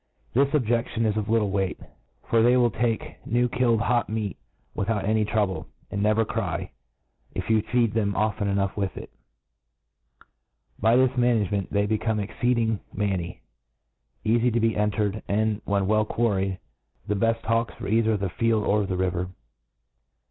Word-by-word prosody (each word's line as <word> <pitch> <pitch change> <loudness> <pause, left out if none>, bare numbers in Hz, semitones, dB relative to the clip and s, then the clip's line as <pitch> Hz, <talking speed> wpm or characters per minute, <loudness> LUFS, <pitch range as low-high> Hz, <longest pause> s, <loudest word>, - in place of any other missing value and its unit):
This 140 +3 +3
objec 120 -4 +1
tion 115 0 -1
is 105 -1 +1
of 105 -1 -2
little 110 -3 +2
weight} 95 -2 -1 0.5
for 115 - +3
they 120 +2 +5
will 120 -2 +3
take 115 +1 -2
new 120 +2 +1
killed 120 -2 +1
hot 120 0 +1
meat 105 -2 -2 0.4
without 100 0 -1
any 110 +1 +2
trouble, 105 -3 -1 0.2
and 100 - -2
never 110 +2 +3
Cry, - - -3 0.6
if - - -2
you 110 -1 +4
feed 115 0 +1
them 100 -3 0
often 105 0 0 0.2
with 100 -2 -2
it. - - -8 1.7
By 115 +2 +4
this 130 0 +4
ma 120 -1 +3
nagement, 105 -5 +1
they 100 0 +1
become 110 +1 0
exceeding 115 +1 0
manny, 95 -4 -2 0.8
eafy 120 +2 +3
to 120 - +1
be 115 -1 +1
entered, 105 0 0
and, 105 +1 0
when 100 -1 +1
well 110 +2 +2
quarried, 100 -5 0 0.5
the 105 - -1
beft 115 +3 +1
hawks 115 0 0
for - - -7
cither 110 0 +2
the 100 -1 -2
field 115 +1 +1
or 105 -1 +1
the 95 -1 -2
river. 90 -1 -1
110 Hz, 160 wpm, -25 LUFS, 100-115 Hz, 1.7 s, they